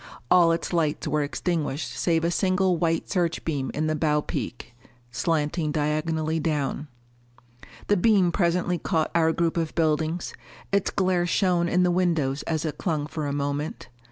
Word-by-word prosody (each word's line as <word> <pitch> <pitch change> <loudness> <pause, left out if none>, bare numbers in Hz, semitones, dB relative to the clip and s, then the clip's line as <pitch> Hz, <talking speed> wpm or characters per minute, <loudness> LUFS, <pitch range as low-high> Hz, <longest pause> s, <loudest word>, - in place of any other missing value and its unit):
All 175 -2 +6
its 165 +2 -2
lights 155 -3 0
were 150 - +1
extinguished 150 0 -2
save 165 -2 +1
a 170 - +1
single 185 0 +2
white 165 0 0
search 175 -4 -1
beam 140 -5 -2
in 155 - 0
the 155 0 0
bow 150 -1 +1
peak, 120 0 -5 0.4
slanting 155 +2 0
diagonally 155 +1 -1
down. 150 -2 -2 1.0
The 205 - +2
beam 190 -2 +4
presently 175 -1 +1
caught 155 +1 0
our 160 -1 +3
group 170 0 0
of 165 -2 -2
buildings; 160 +1 0 0.4
its 200 -1 +2
glare 185 -3 +1
shone 175 -1 +2
in 180 +1 +3
the 180 - +3
windows 165 -6 +1
as 160 -1 -1
it 150 -2 -4
clung 155 -6 -1
for 150 -1 -4
a - - -2
moment. 145 +1 -3
165 Hz, 160 wpm, -25 LUFS, 150-175 Hz, 1.0 s, All